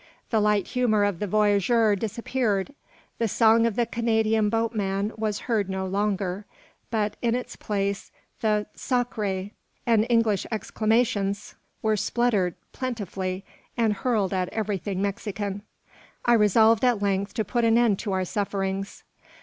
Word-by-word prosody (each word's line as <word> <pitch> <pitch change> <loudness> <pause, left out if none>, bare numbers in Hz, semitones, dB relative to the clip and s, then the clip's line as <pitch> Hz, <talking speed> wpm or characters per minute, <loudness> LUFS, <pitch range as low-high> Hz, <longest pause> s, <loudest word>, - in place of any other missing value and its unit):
The 225 - +3
light 210 -2 +2
humour 230 -5 +2
of 200 -4 0
the 210 - -2
voyageur 210 +2 +3
disappeared. 225 +1 -1 0.5
The 230 - +2
song 225 +2 +4
of 225 - -2
the 240 - +2
Canadian 220 -2 +1
boatman 210 -2 -1
was 215 -2 -2
heard 215 -5 0
no 190 0 -2
longer; 195 0 -1 0.4
but, 215 -2 -1
in 235 -1 +1
its 250 - -5
place, 200 -2 -2 0.3
the 210 -1 +1
"sacre" 210 -6 -2 0.3
and 225 -1 +3
English 230 -5 +2
exclamations 215 -2 0 0.3
were 220 -1 +2
spluttered 210 -5 +1 0.2
plentifully, 195 -6 -4 0.3
and 225 -3 +2
hurled 210 -3 0
at 185 -1 0
everything 200 -3 -2
Mexican. 200 0 -3 0.6
I 240 - +5
resolved 220 +1 +5
at 245 -4 +3
length 200 0 0
to 220 -3 0
put 235 +5 0
an 230 0 +4
end 230 -5 +3
to 210 - -3
our 185 -1 0
sufferings. 195 0 -3
210 Hz, 140 wpm, -25 LUFS, 195-230 Hz, 0.6 s, I